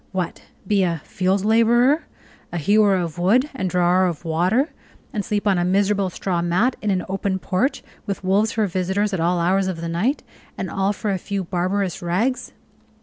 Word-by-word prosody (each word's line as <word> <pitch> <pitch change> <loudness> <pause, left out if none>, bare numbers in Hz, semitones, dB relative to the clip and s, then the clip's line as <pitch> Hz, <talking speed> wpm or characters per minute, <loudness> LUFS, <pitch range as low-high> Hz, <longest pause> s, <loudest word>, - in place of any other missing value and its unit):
What! 185 -3 -3 0.2
be 200 +1 +2
a 170 -5 -1
field 190 +2 0
laborer, 240 +7 +4 0.5
a 175 - -3
hewer 205 +4 +4
of 175 -2 -3
wood 245 +11 +3
and 190 -8 -2
drawer 180 +1 +3
of 170 -1 -5
water, 180 - +1 0.4
and 210 -4 -1
sleep 205 +1 -2
on 195 -3 +3
a - - +1
miserable 195 +1 +1
straw 180 -1 -2
mat 185 +9 +1
in 210 - -1
an 185 -2 0
open 195 0 -1
porch, 200 +9 -1 0.2
with 195 -1 -3
wolves 200 +4 +2
for 220 -2 +1
visitors 190 +2 -1
at 190 - -1
all 175 +2 +1
hours 185 +3 +2
of 185 -3 -3
the 170 - -4
night, 195 - -1 0.3
and - - -4
all 195 +1 +1
for 210 0 -3
a 190 - -1
few 200 +1 -3
barbarous 185 +1 -1
rags! 200 +10 -1
190 Hz, 190 wpm, -22 LUFS, 180-210 Hz, 0.5 s, laborer